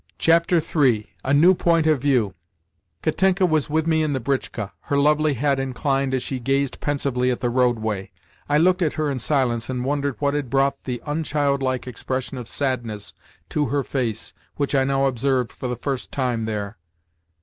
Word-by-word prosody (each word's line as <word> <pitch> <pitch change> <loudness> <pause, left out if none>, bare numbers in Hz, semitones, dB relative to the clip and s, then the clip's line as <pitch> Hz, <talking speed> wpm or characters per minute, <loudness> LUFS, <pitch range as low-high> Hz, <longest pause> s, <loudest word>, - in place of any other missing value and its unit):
III. 160 -8 +3
A 135 - -1
NEW 160 +6 +6
POINT 170 -2 +2
OF 155 -5 +3
VIEW 125 -9 +2 0.7
Katenka 190 0 +2
was 155 -4 +1
with 160 +1 +1
me 160 -1 +2
in 155 -2 0
the 135 - -1
britchka; 120 -5 -2
her 140 - 0
lovely 150 +1 +3
head 140 +2 +1
inclined 135 0 0
as 130 - -2
she 130 - -4
gazed 135 +2 0
pensively 135 -3 0
at 125 - -1
the 120 -2 -1
roadway. 110 -6 0 0.4
I 145 - +4
looked 180 +4 +3
at 160 -4 +1
her 155 -2 -1
in 130 - -3
silence 120 -4 0
and 125 -1 -2
wondered 140 -1 -1
what 140 -1 0
had 145 -4 -2
brought 135 +1 +1
the 120 -3 -4
unchildlike 140 -4 0
expression 130 +1 -4
of 120 - -8
sadness 120 -7 -3 0.4
to 150 -2 0
her 140 +3 0
face 120 -5 -3 0.2
which 140 -1 -1
I 135 -1 +3
now 135 0 +1
observed 130 -1 0
for 130 - -6
the 125 - -2
first 130 +1 -4
time 125 -4 -1
there. 105 -2 -4
135 Hz, 180 wpm, -23 LUFS, 125-145 Hz, 0.7 s, NEW